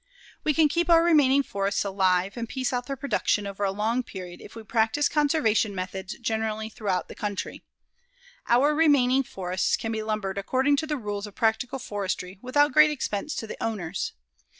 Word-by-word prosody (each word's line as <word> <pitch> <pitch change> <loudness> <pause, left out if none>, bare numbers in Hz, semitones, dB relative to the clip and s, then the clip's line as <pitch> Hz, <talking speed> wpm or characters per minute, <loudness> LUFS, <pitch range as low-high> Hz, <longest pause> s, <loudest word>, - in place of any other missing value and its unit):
We 305 - +1
can 320 -2 +5
keep 340 +3 0
our 335 -1 +6
remaining 285 -5 +4
forests 200 -3 -1
alive 190 -1 +1
and 235 -1 -5
piece 260 -1 -2
out 245 0 -2
their 275 - -3
production 245 -6 0
over 200 0 -4
a 195 - +2
long 220 +5 0
period 185 -6 -9
if - - -12
we 225 - -8
practice 225 +6 +1
conservation 280 -9 +1
methods 185 +1 -5
generally 220 -1 -2
throughout 195 -5 -2
the - - -9
country. 205 -2 -4 0.9
Our 270 +5 +4
remaining 280 -4 +4
forests 185 -6 -1
can 225 - -4
be 220 -1 -2
lumbered 210 -3 -2
according 265 +7 +1
to 315 - -2
the 300 -1 -1
rules 205 -3 -4
of 205 - -13
practical 235 +4 0
forestry 195 -5 -4
without 290 +3 +2
great 305 +2 +7
expense 295 -1 -3
to - - -4
the 215 - -7
owners. 195 -6 -3
225 Hz, 180 wpm, -26 LUFS, 200-275 Hz, 0.9 s, great